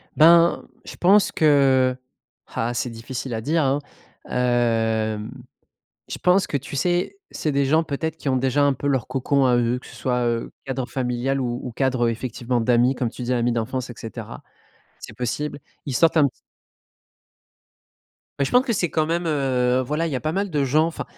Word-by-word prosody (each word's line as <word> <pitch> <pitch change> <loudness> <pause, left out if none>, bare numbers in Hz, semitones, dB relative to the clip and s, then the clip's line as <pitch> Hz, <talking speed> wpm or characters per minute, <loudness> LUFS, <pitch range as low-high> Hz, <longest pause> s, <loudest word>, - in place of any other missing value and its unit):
Ben, 170 +2 +5 0.2
je - - -9
pense 195 +3 +4
que, 135 -4 +3
heu 130 - -26 0.5
ah 120 0 -1
c'est 125 - -2
difficile 120 +2 -6
à 110 - -3
dire, 155 +6 +1
hein. 140 +1 +1 0.5
Hem, 115 -3 0 0.8
je - - -5
pense 180 +1 +3
que 145 - -1
tu 140 +1 -8
sais, 175 - 0
c'est 155 - -2
des 140 0 +1
gens 155 +4 +3
peut-être 160 +1 -3
qui 140 - -3
ont 130 - +2
déjà 135 +2 +1
un 140 -1 +3
peu 145 - -4
leur 135 -5 0
cocon 135 +1 +1
à 125 -1 +4
eux, 120 +1 +1
que - - -15
ce - - -13
soit, 125 -1 -1
heu, 115 -1 -2
cadre 130 -1 -3
familial 130 +1 -1
ou 120 -1 -2
ou 125 - -5
cadre, 125 -1 +1
effectivement, 120 +1 -2
d'amis, 120 +3 +3
comme 125 -2 -1
tu 125 - -8
dis, 125 - -1
amis 120 0 +1
d'enfance, 120 +2 -3
et 120 - -7
cetera. 110 - -8 0.6
C'est - - -10
possible. 125 +5 -3 0.3
Ils 135 - -3
sortent 165 +4 +4
un 145 - +5
petit - - -6 2.1
Bah, 140 - +2
je - - -4
pense 250 +1 +5
que 240 - 0
c'est 185 -6 0
quand 155 0 +1
même, 170 +2 -1
heu 130 -4 +1
voilà, 155 +5 -1
il 160 - -4
y - - 0
a 125 - -3
pas 155 - -1
mal 200 +2 -1
de 150 -3 0
gens. 150 +4 +3
Enfin, 165 - -5
130 Hz, 200 wpm, -23 LUFS, 120-150 Hz, 2.1 s, Ben